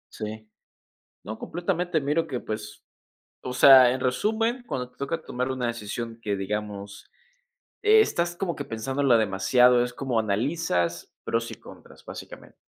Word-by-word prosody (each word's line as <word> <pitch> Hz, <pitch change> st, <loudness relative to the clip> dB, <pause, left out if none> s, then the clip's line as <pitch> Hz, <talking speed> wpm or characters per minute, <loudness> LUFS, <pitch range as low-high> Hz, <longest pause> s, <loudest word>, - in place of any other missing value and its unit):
Sí. 110 Hz, 0 st, -7 dB, 0.8 s
No, 110 Hz, +3 st, -6 dB
completamente 175 Hz, -1 st, -2 dB
miro 150 Hz, +4 st, 0 dB
que, 130 Hz, -5 st, -4 dB
pues, 105 Hz, -1 st, -7 dB, 0.6 s
o 125 Hz, -, -5 dB
sea, 130 Hz, -1 st, +8 dB
en 130 Hz, -, -3 dB
resumen, 225 Hz, -, 0 dB
cuando 125 Hz, -, -4 dB
te -, -, -33 dB
toca 160 Hz, +4 st, -3 dB
tomar 125 Hz, +1 st, -3 dB
una 125 Hz, -2 st, -2 dB
decisión 115 Hz, 0 st, -5 dB
que, 105 Hz, -2 st, -2 dB
digamos, 100 Hz, 0 st, -5 dB, 0.7 s
estás 425 Hz, -, +3 dB
como 175 Hz, -1 st, -3 dB
que 145 Hz, -, -5 dB
pensándola 130 Hz, +3 st, +1 dB
demasiado, 120 Hz, +4 st, +4 dB
es 125 Hz, -, -5 dB
como 130 Hz, -3 st, -1 dB
analizas 105 Hz, -, -1 dB
pros 115 Hz, 0 st, -2 dB
y -, -, -5 dB
contras -, -, -15 dB
básicamente. -, -, -10 dB
125 Hz, 140 wpm, -26 LUFS, 110-155 Hz, 0.8 s, sea